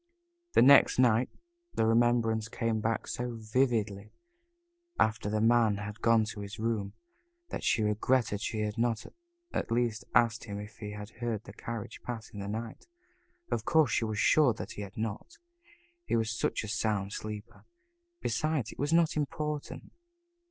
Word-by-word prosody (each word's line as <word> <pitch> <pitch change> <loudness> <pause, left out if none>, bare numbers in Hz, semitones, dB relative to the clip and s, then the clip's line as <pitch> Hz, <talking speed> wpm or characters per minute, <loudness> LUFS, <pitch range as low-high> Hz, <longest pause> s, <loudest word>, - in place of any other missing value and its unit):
The - - +6
next 140 +1 +7
night 125 -1 +4 0.5
the 110 - +2
remembrance 115 -1 +3
came 115 -2 -1
back 115 +1 -1
so 120 -1 -3
vividly 110 -3 0 0.9
after 110 -1 +2
the 110 +1 0
Man 115 -2 +4
had 105 +1 -7
gone 115 -1 +4
to 105 - -9
his 100 +1 -7
room, 110 -3 -1 0.6
that - - -5
she 110 - +2
regretted 105 0 +1
she 110 -1 -2
had 105 +1 -2
not 115 -2 0 0.5
at - - -2
least 115 -1 0
asked 115 -2 +3
him 100 -2 -5
if 105 +1 -9
he 105 -1 -6
had 105 +1 -8
heard 115 -3 -3
a 100 - -9
carriage 115 0 -6
pass 115 -3 -6
in 105 - -8
the 100 - -5
night. 110 - -5 0.6
Of - - 0
course 160 -7 +3
she 115 - +1
was 110 -1 -3
sure 140 +4 +5
that - - -6
he - - -7
had 100 -1 -8
not. 110 +9 -4 0.7
He - - +1
was 110 -1 +1
such 115 - -1
a - - -5
sound 105 -2 -1
sleeper. 110 +2 -7 0.6
Besides, 155 -8 -1
it - - -14
was 145 +2 0
not 165 -1 +4
important. 150 0 -3
110 Hz, 165 wpm, -30 LUFS, 105-120 Hz, 0.9 s, next